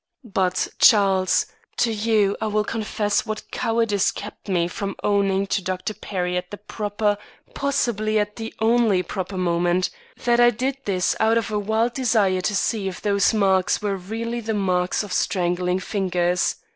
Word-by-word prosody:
But, 190 -5 0
Charles, 195 -3 +4 0.3
to 230 -2 +2
you 210 -2 +2
I 220 - 0
will 210 0 +1
confess 210 -1 -1
what 215 -1 -6
cowardice 225 -3 +1
kept - - -8
me 175 -3 +1
from 195 +2 -4
owning 200 -1 +2
to 195 - 0
Dr. 185 +3 -3
Perry 180 -3 -3
at 180 0 -4
the 205 - -7
proper, 205 0 -2 0.3
possibly 220 -6 0
at 210 0 -1
the 225 -1 -6
only 220 -4 +3
proper 190 0 -5
moment, 175 0 +1 0.3
that 240 0 +3
I 240 0 +7
did 255 +4 -2
this 185 -3 +1
out 220 +1 +3
of 225 -2 -1
a 210 - 0
wild 220 +3 0
desire 215 -7 +2
to 205 +3 -1
see 200 0 0
if 185 - -5
those 200 -1 +2
marks 195 -4 +2
were 200 -1 0
really 225 +5 -4
the 220 -1 -3
marks 185 -1 0
of 200 -3 -6
strangling 180 0 0
fingers. 180 -3 0
205 Hz, 165 wpm, -23 LUFS, 185-220 Hz, 0.3 s, I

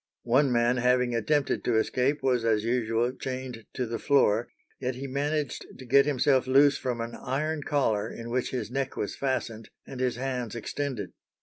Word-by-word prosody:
One 130 +3 +3
man 120 +1 +2
having 125 0 +2
attempted 135 +5 +1
to 120 -2 +2
escape 130 +5 +1
was 125 -3 +2
as 110 -2 +2
usual 120 0 0
chained 130 -4 -6
to 125 - -1
the 115 0 -4
floor, 120 -5 +3 0.3
yet 125 -1 -2
he 135 +2 -6
managed 145 +1 -2
to 130 - -10
get 140 +3 +5
himself 135 -2 +2
loose 140 +2 +5
from 125 -2 -3
an 115 0 -5
iron 150 +6 -2
collar 115 -8 0
in 115 0 -7
which 125 0 0
his 120 -4 -4
neck 135 0 -2
was 105 - -3
fastened 120 -5 -3 0.2
and 130 - -8
his 130 -1 0
hands 125 -3 -3
extended. 120 -3 -4
125 Hz, 180 wpm, -28 LUFS, 115-135 Hz, 0.3 s, get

